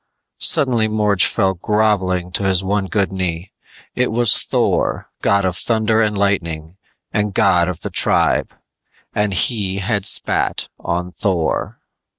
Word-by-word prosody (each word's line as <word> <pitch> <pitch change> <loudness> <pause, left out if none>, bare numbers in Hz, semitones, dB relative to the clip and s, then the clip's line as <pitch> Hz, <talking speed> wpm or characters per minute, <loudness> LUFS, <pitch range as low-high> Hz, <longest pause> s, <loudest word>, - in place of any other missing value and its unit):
Suddenly 120 -5 +2
Morge 105 -3 +2
fell 95 -3 0
grovelling 95 -2 0
to 90 - -1
his 95 -1 +1
one 100 0 -1
good 100 -1 0
knee. 90 -1 -4 0.4
It 125 0 0
was 115 -2 +3
Thor, - - -1
god 100 -1 +2
of 90 -1 -1
thunder 110 +2 +1
and 105 -2 0
lightning 85 -4 -2 0.4
and 105 -2 -1
god 90 -5 +3
of 85 -2 -5
the - - -5
tribe! - - +3 0.6
_And 105 -1 0
he 95 -1 +1
had 100 0 -1
spat - - 0
on 90 +1 -3
Thor! 90 -4 -2
100 Hz, 140 wpm, -18 LUFS, 90-105 Hz, 0.6 s, was